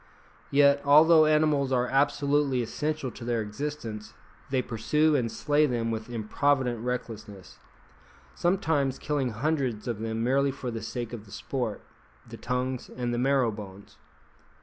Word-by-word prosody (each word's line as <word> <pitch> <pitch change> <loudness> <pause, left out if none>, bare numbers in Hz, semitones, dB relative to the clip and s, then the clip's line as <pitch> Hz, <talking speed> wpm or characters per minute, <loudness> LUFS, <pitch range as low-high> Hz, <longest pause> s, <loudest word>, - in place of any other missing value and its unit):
Yet, 140 0 +4
although 155 +2 +7
animals 150 -3 +2
are 125 -1 +2
absolutely 140 -1 +1
essential 150 +2 -3
to - - -11
their 120 -1 -1
existence, 110 -1 -5 0.3
they 130 -1 0
pursue 150 +8 +1
and 120 -5 0
slay 150 +1 +2
them 115 -3 -1
with 110 +1 -5
improvident 120 +1 0
recklessness, 110 -6 -6 0.7
sometimes 160 -7 0
killing 145 -4 -1
hundreds 125 -2 -2
of 115 -3 -3
them 110 0 -2
merely 135 +3 +2
for 130 -2 -5
the 115 -1 -5
sake 120 +2 -5
of 110 -3 -7
the 100 - -16
sport, 120 0 -4 0.4
the - - -9
tongues, 125 0 -3
and 120 -1 -3
the 120 - -1
marrow 130 -2 +2
bones. 100 -2 -11
125 Hz, 145 wpm, -27 LUFS, 115-145 Hz, 0.7 s, although